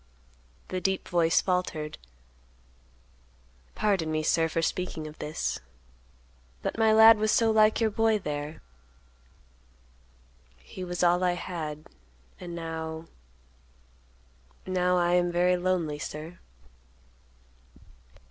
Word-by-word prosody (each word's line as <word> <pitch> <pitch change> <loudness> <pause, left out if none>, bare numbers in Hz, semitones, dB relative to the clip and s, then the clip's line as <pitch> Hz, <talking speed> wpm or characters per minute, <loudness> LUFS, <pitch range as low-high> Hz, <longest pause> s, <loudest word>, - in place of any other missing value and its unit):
The 185 0 -3
deep 190 0 -1
voice 170 -2 +3
faltered. 170 -5 -2 1.8
"Pardon 190 -7 0
me, 155 0 -1
sir, 165 +1 +2
for 165 +1 -1
speaking 165 -3 -2
of 155 0 -10
this, 150 +1 -3 1.0
but - - -2
my 220 -1 +3
lad 220 0 +8
was 215 0 +2
so 225 -1 +3
like 215 0 +4
your 225 -2 +1
boy 225 +1 +2
there. 150 -4 -5 1.9
He 65 - -10
was 175 0 -3
all 175 +1 +3
I 180 -1 +2
had, 155 -4 -6 0.5
and 175 -1 -7
now—now—I 65 - -5
am 175 0 +2
very 180 +1 +3
lonely, 175 -5 -1
sir." 155 +4 -7
170 Hz, 100 wpm, -27 LUFS, 150-185 Hz, 1.9 s, lad